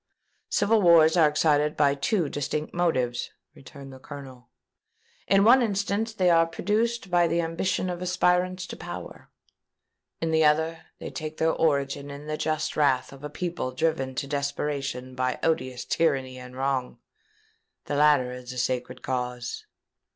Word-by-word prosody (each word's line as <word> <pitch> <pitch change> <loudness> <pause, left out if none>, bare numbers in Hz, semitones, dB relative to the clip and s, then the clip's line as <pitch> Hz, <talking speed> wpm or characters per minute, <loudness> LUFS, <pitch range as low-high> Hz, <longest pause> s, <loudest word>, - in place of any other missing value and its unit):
"Civil 215 +1 +2
wars 165 -3 +6
are 160 -4 +5
excited 150 0 +2
by 145 -1 +4
two 165 +4 0
distinct 145 +2 -3
motives," 130 -9 0 0.2
returned 135 0 -12
the 130 - -12
Colonel. 130 -3 -11 0.8
"In 195 0 +4
one 245 +4 +7
instance 205 0 -1
they 185 -5 +2
are 165 0 +4
produced 215 +3 -1
by 175 -1 +4
the 170 - 0
ambition 170 +3 -1
of 175 -1 -4
aspirants 180 0 +1
to - - -8
power: - - -9 0.9
in 165 0 -1
the 160 0 +3
other, 160 +2 +1
they - - -7
take 155 0 -6
their 160 0 +2
origin 140 -2 0
in 140 +1 -9
the 155 0 -3
just 155 0 -2
wrath 135 -3 +1
of 135 +1 -14
a 150 - -4
people 170 -4 -4
driven 135 -2 -1
to 140 - -2
desperation 140 -2 -3
by 130 0 -1
odious 130 -6 -1
tyranny 135 -5 0
and 125 0 -11
wrong. 130 -1 -2 0.9
The - - -4
latter 145 -3 +4
is 125 0 -8
a 130 - -8
sacred 125 0 -2
cause." 125 -1 -4
150 Hz, 155 wpm, -26 LUFS, 130-170 Hz, 0.9 s, one